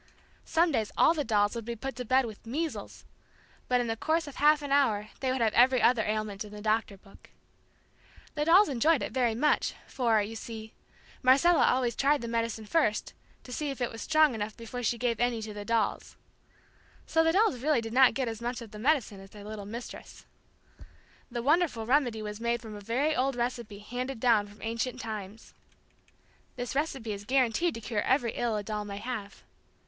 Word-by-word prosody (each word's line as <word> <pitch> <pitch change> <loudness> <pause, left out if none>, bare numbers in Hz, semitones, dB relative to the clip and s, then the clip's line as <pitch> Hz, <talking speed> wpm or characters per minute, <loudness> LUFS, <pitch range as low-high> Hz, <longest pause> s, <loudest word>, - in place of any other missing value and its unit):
Some 330 +1 +2
days 220 -7 -1
all 325 - +6
the 305 -3 -1
dolls 205 -4 +2
would 235 -1 -5
be 235 +2 -5
put 270 +4 -5
to 250 - -4
bed 255 +2 +3
with 220 -3 -9
"measles" 310 +6 -4 0.6
but 250 0 +2
in 245 - 0
the 225 -1 -2
course 320 +7 0
of 285 -2 -10
half 300 0 +4
an 285 - -5
hour 215 -7 +2
they 260 -1 0
would 260 -1 -1
have 220 -2 +2
every 255 +1 +5
other 240 -1 +4
ailment 215 -1 -2
in 210 - -11
the 210 - -9
Doctor 215 -1 0
book. 195 +1 -19 1.0
The 295 -1 -1
dolls 365 +6 +6
enjoyed 285 +3 +2
it - - -4
very 245 -4 +1
much, 300 +6 +1
for, 230 -4 +1
you 210 +2 -3
see, 220 -1 -8 0.5
Marcella 280 +7 +5
always 250 -3 +1
tried 285 0 +2
the 235 - -5
medicine 230 -1 -2
first 215 -4 0 0.3
to 250 - -9
see 300 +2 -2
if 275 - -5
it 245 - -1
was 225 - -8
strong 310 -3 +4
enough 215 -1 -4
before 230 +2 -6
she 240 0 0
gave 235 -2 -1
any 240 -1 +1
to 215 -1 -6
the 205 0 -6
dolls. 230 0 -1
[Illustration: - - -37
Bandaged - - -32
up] - - -16
So 325 - +5
the 325 - +3 0.2
dolls 250 0 -10
really 295 -5 +2
did 225 0 -6
not 260 0 +6
get 265 -2 -1
as 225 0 -5
much 240 +1 -3
of 220 - -13
the 210 - -9
medicine 250 -6 +1
as 195 0 -13
their 205 0 -12
little 210 -1 -7
mistress. 235 +3 -9 1.0
The 240 -1 -4
wonderful 295 -6 +2
remedy 245 -4 +1
was 210 +1 -6
made 235 0 0
from 225 -2 -9
a 205 - -9
very 265 +9 0
old 265 +1 +1
recipe 235 -3 -3
handed 245 +4 -5
down 225 -4 +3
from 205 +1 -15
ancient 230 +2 -2
times. 215 -1 -7 1.0
This 245 -1 -4
recipe 270 -6 -2
is 200 0 -7
guaranteed 265 +7 +1
to 230 - -7
cure 210 -1 -2
every 255 -3 +1
ill 235 -1 -1
a 205 - -3
doll 210 0 -3
may 200 -1 -6
have. 205 -3 -6
235 Hz, 210 wpm, -29 LUFS, 215-270 Hz, 1.0 s, all